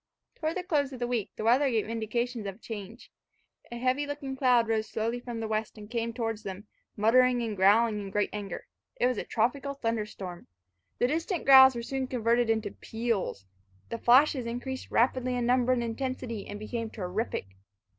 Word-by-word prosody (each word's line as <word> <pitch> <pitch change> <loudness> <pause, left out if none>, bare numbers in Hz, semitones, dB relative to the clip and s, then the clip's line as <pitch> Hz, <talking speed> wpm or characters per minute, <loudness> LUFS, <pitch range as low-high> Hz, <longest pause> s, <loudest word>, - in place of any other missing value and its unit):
Toward 315 +1 -3
the 365 - -3
close 290 -6 0
of 260 - -7
the 240 - -2
week, 240 -4 -1
the - - -5
weather 255 +5 +4
gave 225 -4 0
indications 230 0 -2
of 195 - -5
a - - -20
change. 220 0 -9 0.6
A 240 - -5
heavy 260 +4 0
looking 285 -2 -5
cloud 250 -3 +3
rose 220 -1 0
slowly 230 +2 -2
from 240 -2 -6
the 225 - -3
west, 215 0 -2
and 210 +1 -11
came 230 -1 -1
towards 225 -2 -3
them, 195 0 -7 0.3
muttering 245 +3 +4
and 220 -2 -3
growling 210 +3 +4
in 200 - -6
great 205 +1 0
anger. 200 -3 -5 0.3
It - - +1
was 250 -3 +1
a - - -2
tropical 275 +5 -1
thunderstorm. 210 -7 -4 0.5
The - - +2
distant 330 +6 -1
growls 265 -1 +9
were 235 - -4
soon 265 +1 -3
converted 235 -1 +1
into 220 -2 0
peals. 225 - -3 0.4
The 230 - -4
flashes 255 +1 +4
increased 250 +3 -5
rapidly 255 +1 +2
in 245 -1 0
number 250 +1 +3
and 245 -2 +1
intensity, 235 -2 -4
and 205 - -6
became 225 +2 -4
terrific. 195 - -3
235 Hz, 185 wpm, -29 LUFS, 220-255 Hz, 0.6 s, growls